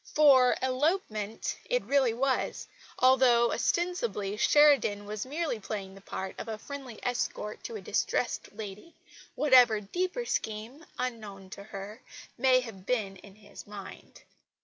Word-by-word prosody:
For 270 -5 +6
elopement 255 - -1
it - - 0
really 275 -4 +3
was, 265 +1 -1 0.3
although 255 -2 +5
ostensibly 235 - -1
Sheridan 275 -5 +4
was 210 +3 -5
merely 300 -4 -2
playing 195 -2 -6
the 195 - -14
part 190 0 -5
of - - -6
a 220 -1 -4
friendly 265 -2 -8
escort 225 -3 -3
to 465 - -5
a - - -6
distressed - - -1
lady, 210 - -9 0.4
whatever 250 -6 +6
deeper 365 - -3
scheme, 225 - -4
unknown 210 -6 -5
to 200 - -9
her, 205 +3 -8 0.3
may 255 0 +4
have 200 -6 -10
been 205 -6 -1
in 195 +1 -15
his 210 -1 -13
mind. 205 -2 -11
235 Hz, 135 wpm, -29 LUFS, 205-275 Hz, 0.4 s, For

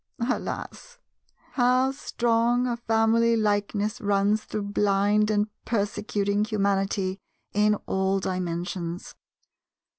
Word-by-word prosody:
Alas, 485 - -4 0.5
how 255 +1 +3
strong 240 -2 +1
a 245 -1 0
family 230 0 +2
likeness 210 0 0
runs 205 +1 +1
through 215 - -4
blind 205 +1 +2
and 210 -1 +2 0.2
persecuting 205 -1 -1
humanity 195 -2 0 0.3
in 210 +1 +3
all 190 0 0
Dimensions! 180 -1 -4
210 Hz, 90 wpm, -26 LUFS, 195-230 Hz, 0.5 s, how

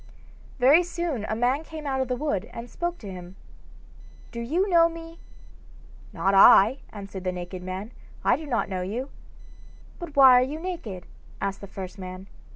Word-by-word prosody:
Very 275 +6 +6
soon 340 -9 -3
a 220 - -2
man 250 +6 +1
came 315 -1 -9
out 265 -1 -1
of 260 - -1
the 250 - -1
wood 245 -8 -2
and 235 +1 -8
spoke 345 0 -3
to 205 - -9
him. 180 0 -10 1.0
'Do 235 - -6
you 330 - 0
know 335 -3 +5
me?' 330 0 -10 0.9
'Not 195 - 0
I,' 200 +5 +7
answered 195 -2 -8
the 185 - -1
naked 180 0 -7
man. 185 +4 -6 0.3
'I - - +4
do 310 0 -9
not 240 -5 0
know 185 -2 -3
you.' 230 +9 -4 0.9
'But 340 -4 -8
why 270 -2 +8
are - - +3
you 290 +5 -4
naked?' 320 - -6 0.3
asked 195 0 -3
the 200 - -8
first 190 0 -8
man. 185 0 -8
240 Hz, 175 wpm, -25 LUFS, 195-310 Hz, 1.0 s, why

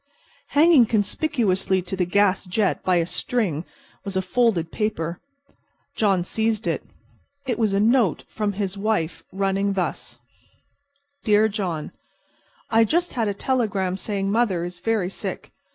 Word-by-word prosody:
Hanging 300 -6 +7
conspicuously 210 -4 +1
to 185 - -4
the 180 -2 0
gas 200 +1 +2
jet 195 +2 0
by 185 - +2
a 170 -1 +2
string 180 -3 -1 0.4
was 195 -2 -3
a - - +2
folded 185 -4 +1
paper. 175 -6 -2 0.8
John 195 -5 +2
seized 220 +3 0
it. - - -1 0.6
It 240 -3 -2
was 215 -3 +2
a - - +2
note 225 - +3
from 210 -2 -2
his 195 -1 -2
wife 170 -6 -1
running 195 +1 0
thus: 185 -2 -3 1.1
"Dear 215 0 +4
John: 185 -7 -3 0.8
I 225 0 +5
just 345 +10 0
had 230 -3 0
a 200 - -1
telegram 200 -7 0
saying 195 0 -2
mother 205 -6 +1
is 175 0 -6
very 215 -5 0
sick. - - -6
200 Hz, 140 wpm, -23 LUFS, 185-225 Hz, 1.1 s, Hanging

